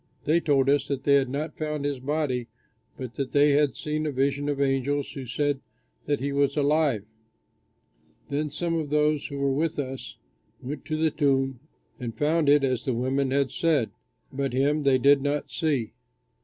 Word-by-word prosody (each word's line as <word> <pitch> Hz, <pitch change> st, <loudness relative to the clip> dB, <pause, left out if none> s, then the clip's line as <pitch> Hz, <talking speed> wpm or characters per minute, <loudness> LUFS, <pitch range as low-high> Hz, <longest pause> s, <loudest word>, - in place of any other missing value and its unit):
They 160 Hz, +3 st, +3 dB
told 140 Hz, -5 st, +2 dB
us 140 Hz, 0 st, +2 dB
that 140 Hz, -3 st, -3 dB
they 140 Hz, -, +4 dB
had 135 Hz, -2 st, +3 dB
not 150 Hz, +3 st, -3 dB
found 150 Hz, -2 st, -2 dB
his 145 Hz, -2 st, -1 dB
body 130 Hz, -3 st, -1 dB, 0.5 s
but 125 Hz, -3 st, -6 dB
that 135 Hz, -2 st, -3 dB
they 145 Hz, 0 st, +5 dB
had 145 Hz, 0 st, +3 dB
seen 155 Hz, 0 st, -2 dB
a -, -, -1 dB
vision 140 Hz, +2 st, 0 dB
of 145 Hz, -1 st, -2 dB
angels 140 Hz, +1 st, 0 dB
who 135 Hz, -3 st, -7 dB
said 145 Hz, +3 st, 0 dB, 0.5 s
that 145 Hz, -, +1 dB
he 140 Hz, +2 st, -2 dB
was 140 Hz, +1 st, +1 dB
alive. 145 Hz, -7 st, +2 dB, 1.2 s
Then 150 Hz, +2 st, -1 dB
some 165 Hz, +3 st, -2 dB
of 160 Hz, -3 st, -1 dB
those 150 Hz, 0 st, +1 dB
who 140 Hz, -, -6 dB
were 140 Hz, -1 st, +1 dB
with 155 Hz, +3 st, -1 dB
us 135 Hz, -2 st, -5 dB, 0.4 s
went 140 Hz, +4 st, -6 dB
to 155 Hz, -, -2 dB
the 160 Hz, 0 st, +2 dB
tomb 135 Hz, -4 st, +1 dB, 0.4 s
and 120 Hz, -3 st, -5 dB
found 150 Hz, 0 st, +2 dB
it 145 Hz, 0 st, +5 dB
as 130 Hz, -3 st, 0 dB
the 130 Hz, -, -1 dB
women 130 Hz, +3 st, 0 dB
had 135 Hz, 0 st, +1 dB
said. 155 Hz, -9 st, +1 dB, 0.4 s
But 135 Hz, -1 st, -2 dB
him 145 Hz, +4 st, +2 dB
they 135 Hz, -2 st, +4 dB
did 140 Hz, +2 st, +5 dB
not 145 Hz, +1 st, -2 dB
see." 145 Hz, -9 st, -1 dB
140 Hz, 185 wpm, -26 LUFS, 135-150 Hz, 1.2 s, they